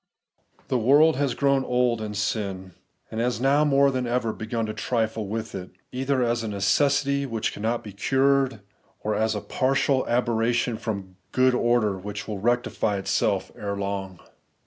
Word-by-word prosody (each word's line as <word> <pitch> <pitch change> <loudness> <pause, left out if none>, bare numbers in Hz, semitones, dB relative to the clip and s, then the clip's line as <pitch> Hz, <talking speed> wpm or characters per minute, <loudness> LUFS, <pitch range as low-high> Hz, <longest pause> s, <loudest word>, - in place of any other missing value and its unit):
The 130 - +1
world 145 +7 +5
has 140 -4 0
grown 140 -1 +2
old 125 -2 +1
in 105 -1 -5
sin, 100 -3 -3 0.4
and 110 - -2
has 120 -2 0
now 140 +4 +3
more 140 -1 +4
than 130 -2 -2
ever 120 -2 0
begun 110 +1 -3
to 110 - -4
trifle 110 -2 -1
with 110 +2 -4
it, 90 -2 -6 0.2
either 130 0 0
as 120 0 0
a 115 - -4
necessity 140 +7 +1
which 115 -3 -2
cannot 115 +3 -2
be 105 - -9
cured, 135 +2 +2 0.4
or 105 - -1
a 110 0 0
partial 135 0 +1
aber 120 0 +1
ration 115 +1 +1
from 95 -4 -5
good 130 0 +3
order 120 -5 +2
which 100 +1 -6
will 105 -3 -4
rectify 110 -2 0
itseK 95 - 0
ere 100 -1 -4
long. 100 -2 -4
115 Hz, 165 wpm, -25 LUFS, 105-130 Hz, 0.4 s, world